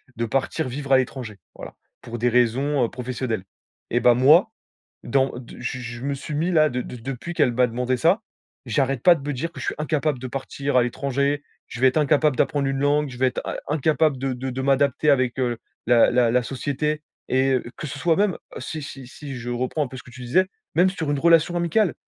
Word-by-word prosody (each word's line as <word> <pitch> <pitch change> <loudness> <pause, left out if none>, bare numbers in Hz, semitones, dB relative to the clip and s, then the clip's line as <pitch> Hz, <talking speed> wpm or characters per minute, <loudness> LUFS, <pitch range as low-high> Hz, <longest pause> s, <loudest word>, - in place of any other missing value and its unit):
de 115 +1 -1
partir 135 +5 -1
vivre 135 +2 -5
à 135 - +7
l'étranger. 125 -5 -3 0.2
Voilà, - - -10 0.3
pour 120 0 -7
des 120 +2 +1
raisons, 125 +4 +2
heu, - - -4
professionnelles. 125 -5 -4 0.5
Et 120 - +2
bah 120 +1 +5
moi, 150 - +5 0.5
dans 135 +2 +1
de 125 -1 -11
je 125 +1 -3
je 120 -1 -7
me 140 +1 -1
suis 150 +3 -7
mis 160 +4 0
là, 155 -3 +4
de 125 0 -2
de - - -8
depuis 130 +7 -6
qu'elle 125 -6 +3
m'a 125 +1 +3
demandé 125 +2 -1
ça, 170 - +3 0.4
j'arrête 130 +2 0
pas 180 - +8
de 150 - -8
me 145 - -5
dire 165 +7 -3
que: - - -10
«Je - - -5
suis - - -1
incapable 150 -2 0
de 130 - -5
partir 135 +1 -2
à 125 - +5
l'étranger. 140 +3 -1 0.2
Je - - -8
vais 130 - +7
être 130 - +1
incapable 150 -1 +3
d'apprendre 140 -2 +1
une 135 0 -1
langue. 145 +1 +2
Je 125 - -9
vais 130 - +4
être 125 - -2
in - - -3
incapable 150 -1 +2
de 135 0 -2
de 130 +2 -4
de 130 +1 -3
m'adapter 140 +2 +2
avec, 130 -3 +1
heu, 120 -2 0 0.3
la 120 -1 +6
la 120 -2 +3
la 125 - +3
société.» 145 +4 -2 0.3
et 130 0 +3 0.2
que - - -6
ce 145 - -6
soit 165 0 +2
même, 200 -2 +1 0.2
si 155 +4 -5
si 135 -2 -8
si 140 +1 -8
je 120 0 -5
reprends 130 +5 -1
un - - -4
peu 130 - -9
ce - - -8
que - - -15
tu 125 - -11
disais, 175 +10 +2 0.3
même 180 +3 +5
sur 160 -6 -3
une 145 - 0
relation 170 +2 +4
amicale, 175 +2 +2
135 Hz, 230 wpm, -23 LUFS, 125-150 Hz, 0.5 s, pas